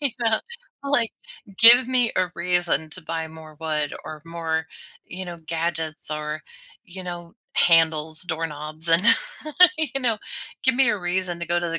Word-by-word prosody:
you 285 -2 +1
know, 225 -2 +2 0.4
like, 260 -5 +2 0.5
give 235 +2 +8
me 250 -3 +2
a 185 -1 +1
reason 170 -3 0
to 185 +3 -11
buy 160 0 -4
more 155 -1 -13
wood 155 -2 -1
or 155 -1 -8
more, 165 -1 -2 0.4
you 185 +1 -7
know, 175 -1 -7
gadgets 160 -1 -3
or, 150 +1 -4 0.4
you 185 -2 -9
know, 175 0 -7 0.2
handles, 160 -1 +3
doorknobs, 160 -1 -5
and 165 +2 +5 0.8
you 285 -3 -2
know, 230 -4 +1 0.5
give 260 -2 +4
me 265 0 +4
a 210 - -1
reason 180 -1 -2
to 175 - -3
go 175 +1 +2
to 175 - -2
the 165 - -2
170 Hz, 165 wpm, -24 LUFS, 160-190 Hz, 0.8 s, give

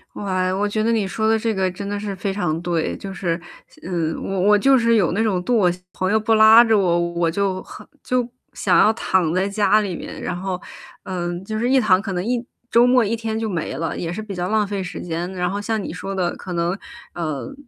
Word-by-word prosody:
哇， 185 -2 -1
我 205 +2 0
觉 215 +1 -1
得 230 - +2
你 215 -4 +1
说 220 +3 0
的 225 - +4
这 225 0 -1
个 190 -1 0
真 200 +2 -7
的 205 0 -3
是 200 -2 -4
非 195 +1 -3
常 175 -5 -1
对。 170 -2 -1
就 195 -1 -7
是 175 -3 -2 0.4
嗯， 165 -3 -2
我 195 -1 -2
我 210 +2 +5
就 270 +5 +4
是 230 -1 +3
有 190 -6 +3
那 205 +5 0
种 185 -5 0
惰 245 - 0
我 185 -5 +4 0.2
朋 185 +1 -1
友 220 - +3
不 225 +1 +1
拉 220 +2 +8
着 225 -2 +3
我， 175 -3 +2 0.2
我 170 -1 +1
就 190 +1 -1
很 - - -12 0.2
就 250 -2 0 0.3
想 - - +2
要 215 - +6
躺 180 -7 +1
在 190 +2 +1
家 210 +1 +3
里 190 -4 -3
面。 - - -8
然 180 - -3
后， 185 0 -3 0.4
嗯， 175 -1 -4
就 215 +1 -3
是 240 +2 0
一 265 0 +5
躺， 195 -4 +3
可 200 -3 -4
能 180 +2 -2
一 245 0 -1 0.3
周 240 +1 +6
末 250 -3 +4
一 230 +3 0
天 220 -1 -3
就 225 - -2
没 170 -8 -3
了， 165 +4 -3
也 170 -1 -4
是 215 - -4
比 210 -2 -7
较 180 +1 -3
浪 215 -2 +2
费 200 -1 -3
时 180 - -6
间。 175 +2 -4
然 180 0 -1
后 200 +2 -3
像 220 0 -1
你 - - -6
说 195 0 -5
的 175 -2 -1
可 180 - -7
能， 170 +2 0 0.4
呃， 165 - -4
195 Hz, 265 characters per minute, -21 LUFS, 180-220 Hz, 0.4 s, 拉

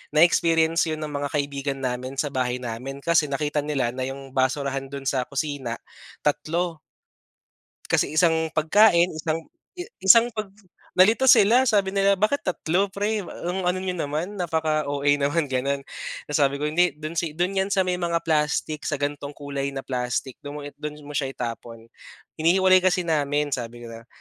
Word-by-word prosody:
na-experience 165 +1 +4
yun 155 0 -3
ng 150 - -5
mga 145 0 -3
kaibigan 140 -1 -2
namin 130 +1 -3
sa 140 +1 -1
bahay 125 -1 -1
namin. 130 +4 -6
Kasi 165 -2 +3
nakita 145 +1 -1
nila 140 -5 -1
na 130 0 -3
yung 135 0 -8
basurahan 135 0 0
dun 140 0 -7
sa 130 -2 0
kusina 140 -4 -3 0.5
tatlo. 165 +3 -1 1.1
Kasi - - +1
isang 160 -1 +3
pagkain, 175 +2 +4
isang 155 +1 -3 0.6
isang 230 +5 +7
pag 215 -2 -4 0.5
nalito 220 +8 +5
sila, 245 +3 +6
sabi 200 -4 +2
nila, 200 0 +3
"Bakit 215 +9 +1
tatlo 185 +2 +1
p're? 205 +2 -2
Ang 180 +1 -3
ano 180 +1 +1
n'yo 185 - -1
naman, 170 +5 -3
napaka-OA 155 -4 0
naman." 145 +1 0
Gano'n. 140 +2 -1 0.4
Tapos 150 +1 -1
sabi 140 -1 +3
ko, 140 - -5
"Hindi 175 -1 +2
do'n 155 +2 -6
si 160 -3 -4
do'n 175 +3 0
'yan 190 - +1
sa 195 -1 +2
may 180 -1 -1
mga 170 -1 -1
plastic, 155 -1 0
sa 145 - 0
ganitong 145 0 -4
kulay 140 -1 -4
na 135 - -4
plastic 125 0 -3
mo, 145 0 -7 0.2
do'n 150 0 -6
mo 145 - -9
siya 145 -2 -1
itapon. 115 -1 -7 0.5
Hinihiwalay 185 +3 +5
kasi 185 0 +1
namin." 145 -2 0
Sabi 120 -2 -4
ko 115 - -9
na, 115 +1 -11
150 Hz, 165 wpm, -24 LUFS, 140-175 Hz, 1.1 s, isang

